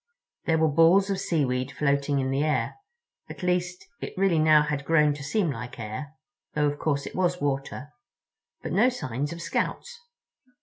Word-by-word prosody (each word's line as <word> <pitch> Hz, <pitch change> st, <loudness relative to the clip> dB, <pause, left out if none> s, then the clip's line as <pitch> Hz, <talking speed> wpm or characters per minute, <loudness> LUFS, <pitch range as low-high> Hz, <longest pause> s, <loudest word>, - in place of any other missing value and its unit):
There 160 Hz, -1 st, +2 dB
were 160 Hz, 0 st, +3 dB
balls 165 Hz, +6 st, +4 dB
of 195 Hz, -, -1 dB
seaweed 135 Hz, -8 st, 0 dB
floating 140 Hz, 0 st, +1 dB
in 130 Hz, -1 st, 0 dB
the 135 Hz, +2 st, +1 dB
air—at 405 Hz, -, -5 dB
least, 180 Hz, 0 st, -1 dB
it -, -, -7 dB
really 190 Hz, -4 st, +3 dB
now 155 Hz, -1 st, +6 dB
had 150 Hz, -2 st, -2 dB
grown 150 Hz, -1 st, +3 dB
to 145 Hz, -1 st, -8 dB
seem 175 Hz, +3 st, 0 dB
like 125 Hz, -2 st, -7 dB
air, 115 Hz, +7 st, -6 dB, 0.4 s
though, 150 Hz, 0 st, +2 dB
of 145 Hz, 0 st, -1 dB
course, 140 Hz, -3 st, -1 dB
it -, -, -7 dB
was 180 Hz, -1 st, +1 dB
water—but 145 Hz, -, -6 dB
no 225 Hz, +6 st, +4 dB
signs 145 Hz, -, -4 dB
of 170 Hz, 0 st, -6 dB
Scouts. 485 Hz, -, -3 dB
150 Hz, 165 wpm, -26 LUFS, 140-180 Hz, 0.4 s, now